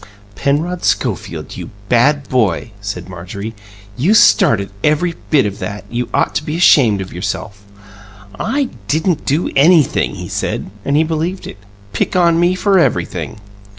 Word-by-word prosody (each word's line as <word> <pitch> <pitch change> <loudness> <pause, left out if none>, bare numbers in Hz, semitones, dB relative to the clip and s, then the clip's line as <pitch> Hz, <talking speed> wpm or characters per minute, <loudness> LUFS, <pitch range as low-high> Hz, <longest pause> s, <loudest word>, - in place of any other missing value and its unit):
"Penrod 160 - -1
Schofield, - - -2
you - - -7 0.2
bad 135 +5 +2
boy," 110 -4 0
said 95 -3 -5
Marjorie, 100 +5 -7 0.4
"you 175 - +2
started 115 - +4
every 155 +3 +2 0.2
bit 145 -7 +4
of 100 -1 -4
that! 105 0 -5
You 120 +1 -2
ought - - +1
to - - -1
be 150 +2 -3
ashamed 120 - +5
of 95 - -7
yourself." 95 +2 -5 0.8
"I 275 -1 -1 0.2
didn't 160 - 0
do 150 +5 0
anything," 155 +1 +4
he - - -7
said - - -3
and 140 +1 +1
he 155 - +4
believed 165 +4 -3
it. - - -9 0.3
"Pick 110 - -1
on 170 -2 +3
me 175 +1 +3
for 195 0 +3
everything!" 110 -8 -1
145 Hz, 150 wpm, -16 LUFS, 105-170 Hz, 0.8 s, ashamed